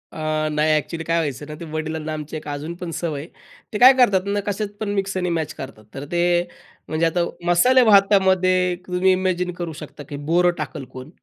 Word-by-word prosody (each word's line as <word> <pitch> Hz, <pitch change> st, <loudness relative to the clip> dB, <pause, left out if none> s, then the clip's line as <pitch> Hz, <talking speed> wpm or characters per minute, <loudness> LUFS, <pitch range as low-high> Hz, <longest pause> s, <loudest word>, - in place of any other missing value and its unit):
अ, 155 Hz, -1 st, -1 dB
नाही 150 Hz, +1 st, +2 dB
एक्चुअली. 165 Hz, +2 st, -4 dB
काय 165 Hz, -, +3 dB
व्हायचं 145 Hz, -2 st, -3 dB
ना, -, -, -6 dB
ते 170 Hz, -, -7 dB
वडिलांना 155 Hz, 0 st, -3 dB
आमची 155 Hz, 0 st, -6 dB
एक 150 Hz, -, -10 dB
अजून 145 Hz, +3 st, -5 dB
पण 175 Hz, -, -4 dB
सवय 160 Hz, -5 st, -3 dB
आहे. 165 Hz, -, -11 dB, 0.4 s
ते -, -, -1 dB
काय 260 Hz, +2 st, +10 dB
करतात 200 Hz, -7 st, +4 dB
ना, 205 Hz, 0 st, 0 dB
कशात 205 Hz, +1 st, -1 dB
पण 215 Hz, -2 st, -3 dB
मिक्स 195 Hz, -1 st, -2 dB
आणि 180 Hz, -1 st, -1 dB
मॅच 155 Hz, -1 st, -3 dB
करतात. 130 Hz, -5 st, -10 dB
तर 140 Hz, +1 st, -6 dB
ते, 175 Hz, 0 st, +1 dB, 0.7 s
म्हणजे 160 Hz, +1 st, 0 dB
आता 170 Hz, +1 st, +1 dB, 0.2 s
मसाले 250 Hz, +9 st, +5 dB
भातामध्ये 190 Hz, -3 st, +4 dB
तुम्ही 180 Hz, +1 st, +2 dB
इमॅजिन 185 Hz, -1 st, 0 dB
करू 170 Hz, -3 st, -4 dB
शकता 145 Hz, -1 st, -9 dB
की 145 Hz, -, -5 dB
बोरं 175 Hz, +1 st, +4 dB
टाकल 150 Hz, -4 st, -5 dB
कोण? 130 Hz, +3 st, -9 dB
170 Hz, 205 wpm, -22 LUFS, 155-185 Hz, 0.7 s, काय